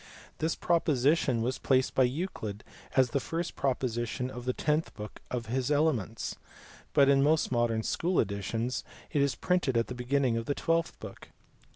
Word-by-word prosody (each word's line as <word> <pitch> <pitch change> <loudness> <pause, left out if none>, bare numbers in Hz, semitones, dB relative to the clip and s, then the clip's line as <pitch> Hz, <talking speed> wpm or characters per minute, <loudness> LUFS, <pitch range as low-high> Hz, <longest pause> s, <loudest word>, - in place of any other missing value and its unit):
This 160 +1 0
proposition 145 -6 +2
was 125 +2 -1
placed 130 -1 +2
by 130 - +4
Euclid 125 - -4 0.3
as 130 -2 +4
the 140 - +1
first 165 +5 -3
proposition 125 -2 -1
of 125 -1 -7
the 125 - +2
tenth 155 +4 0
book 105 0 -8
of 120 -2 -3
his 125 +3 -1
Elements, 145 -8 0 0.6
but 140 -2 +6
in 135 0 +5
most 155 +1 +3
modern 120 -2 +1
school 175 +9 0
editions 110 +4 -1 0.3
it 145 - +2
is 140 -3 +2
printed 180 -8 +1
at 115 - +1
the - - -3
beginning 125 0 +1
of 115 - -4
the 145 - 0
twelfth 165 0 0
book. - - -10
130 Hz, 170 wpm, -30 LUFS, 120-150 Hz, 0.6 s, but